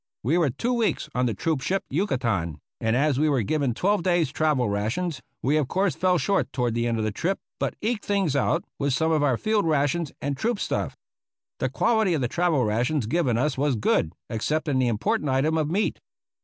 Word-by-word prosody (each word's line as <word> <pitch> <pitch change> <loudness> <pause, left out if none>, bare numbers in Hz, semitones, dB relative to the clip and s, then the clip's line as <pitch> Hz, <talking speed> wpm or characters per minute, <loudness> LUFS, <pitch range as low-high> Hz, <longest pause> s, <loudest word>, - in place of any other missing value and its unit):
We 155 +10 +2
were 160 -5 +3
two 235 - -1
weeks 235 -3 0
on 125 0 +1
the 115 - -1
troop 155 +6 -1
ship 195 +7 -1
Yucatan, 115 - 0 0.2
and 110 +1 +1
as 140 0 +2
we 155 +1 +3
were 135 -6 +2
given 140 0 0
twelve 200 +4 +1
days' 175 -5 +1
travel 150 -6 +1
rations, 115 - -2 0.2
we 145 +4 +2
of 150 -4 +1
course 190 +4 +1
fell 180 -1 +2
short 195 +2 0
toward 120 -4 0
the 120 +1 0
end 115 -1 0
of 110 - -1
the 110 - 0
trip, 180 - -1 0.2
but - - -1
eked 220 0 -1
things 195 -8 0
out 155 +5 +1 0.2
with 140 -2 +1
some 160 +2 +1
of 155 -2 +2
our 135 -5 +2
field 215 - +1
rations 150 +1 +1
and 140 0 -2
troop 220 - -1
stuff. - - -2 0.6
The - - 0
quality 220 -7 +2
of 150 - -1
the 125 - +1
travel 165 -3 +1
rations 120 +5 0
given 135 -1 +1
to 120 - +1
us 150 -3 -1
was 145 -2 +2
good, 95 -7 +1 0.2
except 150 +8 -1
in 135 -3 +1
the 130 - +2
im 115 -3 0
portant 210 - 0
item 135 +5 +2
of 155 -2 0
meat. 200 +6 0
150 Hz, 225 wpm, -25 LUFS, 125-175 Hz, 0.6 s, were